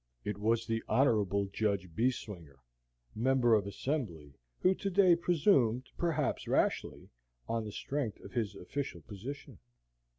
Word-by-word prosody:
It 105 -1 -3
was 115 +2 +1
the 115 -1 -1
Hon. 100 -7 +2
Judge 100 -4 0
Beeswinger, 100 - -2 0.6
Member 120 0 +3
of 105 -2 +3
Assembly, 100 - -3 0.2
who 185 - +3
to 195 - -3
day 185 -2 +5
presumed, 140 - +2
perhaps 155 -5 -1
rashly, - - 0 0.4
on 115 -1 -1
the 105 - -5
strength 135 -2 -3
of - - -11
his 110 -5 -2
official 90 -2 -5
position. 115 - -8
115 Hz, 130 wpm, -32 LUFS, 100-140 Hz, 0.6 s, day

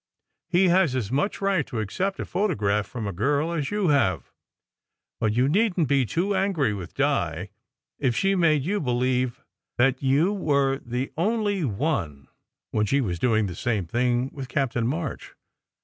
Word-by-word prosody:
He 180 +1 +4
has 175 -6 +3
as 115 -5 -2
much 145 +12 -1
right 195 -4 +2
to 115 - -4
accept 185 - -2
a - - -3
photograph 105 - 0
from 115 -4 -5
a 100 - -3
girl 145 - 0
as 150 -5 -2
you 205 -4 0
have. 95 - +1 0.9
But 110 -1 +1
you 125 +3 +2
needn 185 +2 +2
t - - +2
be 135 -1 +2
too 185 - 0
angry 185 - +1
with 90 -4 -7
Di, 100 - 0 0.5
if 130 -5 +1
she 195 0 +2
made 160 -6 +3
you 200 +7 0
believe 125 -1 0 0.3
that 130 +1 +2
you 145 +8 +2
were 140 -7 +1
the 125 +3 -3
only 205 0 0
one, 100 - -2 0.4
when 105 -1 +1
she 140 - +2
was 90 -10 -2
doing 110 0 +2
the 90 - -4
same 105 0 -1
thing 120 +6 0
with 135 -2 -7
Captain 120 -5 0
March. 150 +1 -4
135 Hz, 170 wpm, -25 LUFS, 115-170 Hz, 0.9 s, He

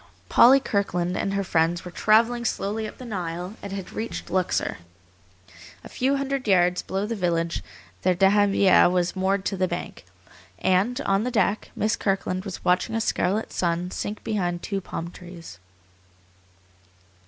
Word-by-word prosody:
Polly 260 +3 +7
Kirkland 180 -7 -1
and 195 0 -1
her 200 - 0
friends 170 0 0
were 180 - -7
travelling 230 +5 +3
slowly 215 0 -2
up - - -11
the 255 - -9
Nile, 180 -3 -4
and 200 - -7
had 195 -2 -6
reached 225 +1 -5
Luxor. 185 - 0 1.0
A - - -10
few 270 +2 0
hundred 275 -2 -2
yards 180 -2 +3
below 195 +2 -3
the 230 +2 -3
village 170 -3 -1 0.4
their 185 0 +2
dahabiyeh 195 -1 +4
was 180 0 0
moored 190 +1 0
to 195 - -1
the 185 0 +1
bank, 175 - -6 0.5
and, 200 +8 +1
on 195 -3 +1
the 250 - -1
deck, 215 -3 0
Miss 215 +1 +1
Kirkland 190 -1 -1
was 190 -4 -7
watching 180 +5 +2
a - - +1
scarlet 210 -1 -1
sun 175 +1 -1
sink 205 +2 -5
behind 175 -5 -2
two 195 -1 -3
palm 170 -1 -6
trees. 170 - -11
195 Hz, 155 wpm, -25 LUFS, 180-215 Hz, 1.0 s, Polly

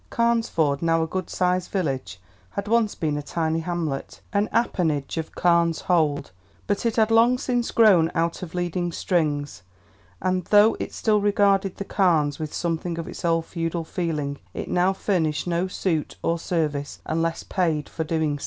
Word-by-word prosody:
Carnesford, 225 - +1
now 165 -1 +2
a - - -2
good 185 +2 -4
sized 180 0 0
village, 135 - -2 0.3
had 200 0 -5
once 225 -1 +2
been 150 -2 -1
a - - -2
tiny 160 +2 -1
hamlet, 165 -5 -3
an 205 +1 +1
appanage 160 - 0
of 160 -1 -4
Carne's 170 -2 +2
Hold, 155 - +1 0.3
but 205 +3 0
it 230 - -1
had 220 -1 +3
long 235 +2 +5
since 245 -2 -1
grown 190 -8 +5
out 165 0 0
of 180 -2 -7
leading 175 0 -1
strings, 145 - -1 0.6
and 185 -1 0
though 210 +1 +5
it - - -4
still 210 -2 +1
regarded 200 -2 +2
The 200 - -4
Carnes 160 -9 +2
with 155 -1 -4
something 170 0 -2
of 165 - -5
its - - -8
old 165 -1 +1
feudal 165 -1 -3
feeling, 155 -4 -3 0.2
it - - -5
now 180 +2 +3
furnished 165 -6 0
no 175 +1 0
suit 175 -4 -2
or 170 0 0
service 150 -4 -2
unless 165 +1 -1
paid 160 -5 -1
for - - -6
so 160 - -2
doing. 155 -3 0
170 Hz, 170 wpm, -24 LUFS, 160-195 Hz, 0.6 s, long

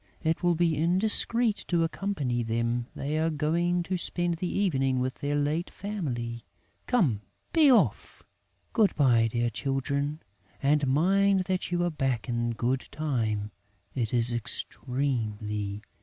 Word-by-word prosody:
It 160 0 0
would 175 -2 +2
be 170 -2 +2
indiscreet 210 +7 +2
to 170 -2 +2
accompany 160 -9 -1
them; 115 +1 -1
they 150 +3 -2
are 160 +1 +2
going 170 +3 0
to 185 +2 -2
spend 175 -1 -2
the 180 +1 -2
evening 135 -10 +1
with 130 +1 -2
their 145 +1 -1
late 150 +4 0
family. 120 - -4 0.4
Come, 155 - +2 0.3
be 310 -4 +6
off! 180 - +1 0.5
Good 215 -3 +3
bye, 120 -6 +4
dear 120 0 0
children, 140 +4 -2 0.4
and 145 0 +2
mind 190 +7 +3
that 185 0 -2
you 175 0 0
are 175 - 0
back 135 -7 -1
in 120 -1 -1
good 125 +3 -1
time: 110 -9 -1 0.4
it 115 -5 -2
is 120 0 +4
extremely 115 -4 -3
important!" 105 +1 -14
145 Hz, 140 wpm, -28 LUFS, 120-175 Hz, 0.5 s, be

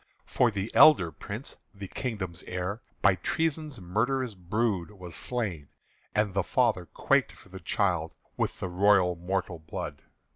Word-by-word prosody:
For 125 - +3
the 100 -1 -4
elder 95 - +7
Prince, 75 - -7 0.2
the 100 -1 -7
kingdom's 95 -8 -4
heir, 90 +5 -3 0.2
By 95 - +7
treason's 155 - -1
murderous 115 +7 0
brood 95 0 -1
Was 90 -5 -10
slain; 100 - -3 0.5
and 105 -2 +2
the 100 - +2
father 110 -5 +1
quaked - - +1
for - - -18
the 95 0 -9
child 90 -5 0 0.2
With - - -2
the - - -2
royal 90 0 +4
mortal 90 0 -2
blood. 75 -2 -6
95 Hz, 145 wpm, -28 LUFS, 90-115 Hz, 0.5 s, elder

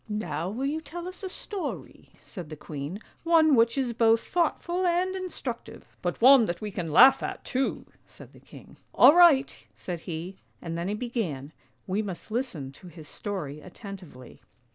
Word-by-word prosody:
" - - -31 0.2
Now 170 +3 -2
will 240 +7 -3
you 305 +3 -2
tell 340 +4 -7
us 365 0 -9
a 380 - -5
story," 390 +1 -7
said 175 -7 -9
the 155 - -7
queen, 150 +6 -7
" - - -34
one 325 -2 +5
which 230 0 +3
is 255 -3 0
both 225 0 +4
thoughtful 345 +1 -1
and 360 +2 +1
instructive." 325 -10 -6
" - - -35
But 175 -1 -2
one 260 0 +7
that 175 -3 -3
we 210 -1 -5
can 175 -4 -4
laugh 265 - +7
at - - -5
too," 265 +1 -2 0.2
said - - -15
the - - -16
king. - - -15 0.2
"All - - +8
right! 325 -6 +6
" 100 - -39
said 140 +10 -6
he, 175 +4 -5 0.2
and 165 -1 -6
then 170 +2 -3
he 205 - -1
began: 195 - -4 0.3
we 195 +3 -1
must 195 0 -7
listen 215 - -3
to 180 +7 -15
his 165 -3 -12
story 150 -8 -5
attentively. 185 - -11
220 Hz, 190 wpm, -27 LUFS, 170-280 Hz, 0.3 s, All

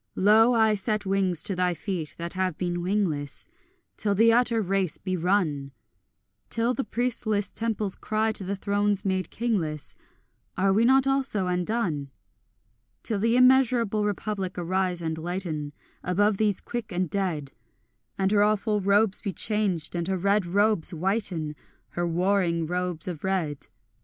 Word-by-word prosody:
Lo, 220 +4 +5
I 220 -1 +4
set 210 +1 -2
wings 190 -4 0
to 195 - -3
thy 180 -1 +1
feet 175 -5 -5
that 170 0 -5
have 185 -3 -1
been 175 -1 -2
wingless, 175 -7 -2 0.5
Till 205 -2 0
the 225 +3 +5
utter 235 -1 +3
race 195 -4 0
be 185 -1 -3
run; 160 -7 0 0.8
Till 230 +2 +1
the 270 - -2
priestless 220 -5 -1
temples 220 -4 -2
cry 220 +1 0
to 210 - -3
the 195 +2 -3
thrones 205 0 0
made 190 -3 -1
kingless, 175 -11 -2 0.6
Are 195 +1 +3
we 220 +4 +3
not 265 +2 +4
also 270 -8 0
undone? 180 -5 -1 0.9
Till 215 -3 -2
the 230 +3 +2
immeasurable 250 -4 +4
Republic 205 -2 -3
arise 180 0 -1
and 160 0 -3
lighten 165 -4 -3 0.3
Above 200 +3 +1
these 210 -2 +1
quick 235 -3 -5
and 180 0 -1
dead, 165 -7 -2 0.7
And 190 0 +1
her 205 -1 +4
awful 210 0 +1
robes 200 +1 +3
be 200 - -3
changed, 205 -7 0
and 170 0 -2
her 190 0 0
red 200 +1 +1
robes 205 -1 +4
whiten, 175 -4 -1 0.3
Her 175 0 -2
warring 175 -1 +1
robes 180 -1 -3
of 175 -5 -5
red. 175 -7 -2
195 Hz, 150 wpm, -26 LUFS, 175-215 Hz, 0.9 s, Lo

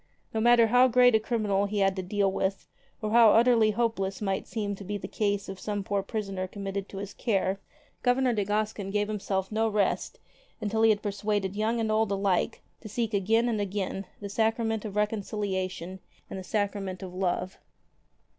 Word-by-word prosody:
No 220 - 0
matter 240 0 +6
how 245 +3 +5
great 250 0 +5
a 220 - +5
criminal 210 -3 0
he 205 +1 -3
had 195 -1 +2
to 190 - -2
deal 195 +1 0
with, 190 0 -2 0.4
or 210 - -1
how 230 -2 +7
utterly 230 -1 +5
hopeless 210 -3 -1
might 195 -2 -2
seem 210 -3 -3
to 200 - -8
be 205 +2 -3
the 190 - -7
case 205 -1 -1
of 190 -1 -7
some 205 -2 -3
poor 200 0 -1
prisoner 195 -2 -4
committed 195 0 -5
to 195 - -8
his 200 0 -6
care, 195 -4 0 0.4
Governor 250 0 +2
de 210 -2 0
Gascon 210 -1 -2
gave 205 +1 0
himself 195 -2 -2
no 220 +1 +1
rest 210 -1 0 0.4
until 220 0 -1
he 225 - +6
had 210 -2 +2
persuaded 205 -1 -1
young 220 +3 0
and 220 -1 0
old 215 -1 +2
alike 195 +2 0 0.2
to 215 - -10
seek 225 +1 -2
again 220 +4 +2
and 220 -3 0
again 195 -1 -3
the 200 - -6
Sacrament 225 +1 0
of 205 -2 -6
Reconciliation 195 -4 -2 0.3
and 190 - -4
the - - -7
Sacrament 200 -2 -2
of 185 -1 -7
Love. 185 0 -2
205 Hz, 190 wpm, -28 LUFS, 195-220 Hz, 0.4 s, how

